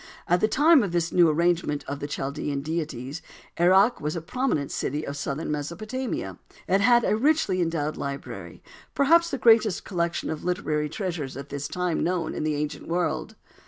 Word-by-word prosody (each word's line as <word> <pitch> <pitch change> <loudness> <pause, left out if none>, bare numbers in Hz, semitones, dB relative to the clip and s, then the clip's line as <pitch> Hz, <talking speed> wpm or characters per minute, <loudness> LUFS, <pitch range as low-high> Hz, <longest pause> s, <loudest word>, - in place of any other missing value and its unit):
At 175 +1 +2
the 215 - +4
time 300 +5 +5
of 195 -5 -2
this 170 -1 0
new 175 -2 +5
arrangement 165 -2 +1
of 140 +1 -4
the 145 - -4
Chaldean 140 0 -3
deities 150 -2 -4 0.4
Erech 190 +7 +4
was 150 +2 -2
a 170 - -3
prominent 215 - -1
city 150 +3 -2
of 140 - -5
southern 145 +2 -3
Mesopotamia. 215 - -4 0.3
It 195 +2 +3
had 240 +2 +5
a - - +2
richly 225 - +2
endowed 160 -3 -1
library, 140 0 -6 0.3
perhaps 335 +5 +4
the 275 - -2
greatest 225 -4 +4
collection 170 -2 -2
of 155 - -5
literary 155 -5 -1
treasures 160 -6 -4
at 140 0 -8
this 145 0 -4
time 180 -2 -1
known 175 -2 -1
in - - -4
the 155 -1 0
ancient 150 +1 -4
world. 175 +1 -1
170 Hz, 175 wpm, -26 LUFS, 150-200 Hz, 0.4 s, time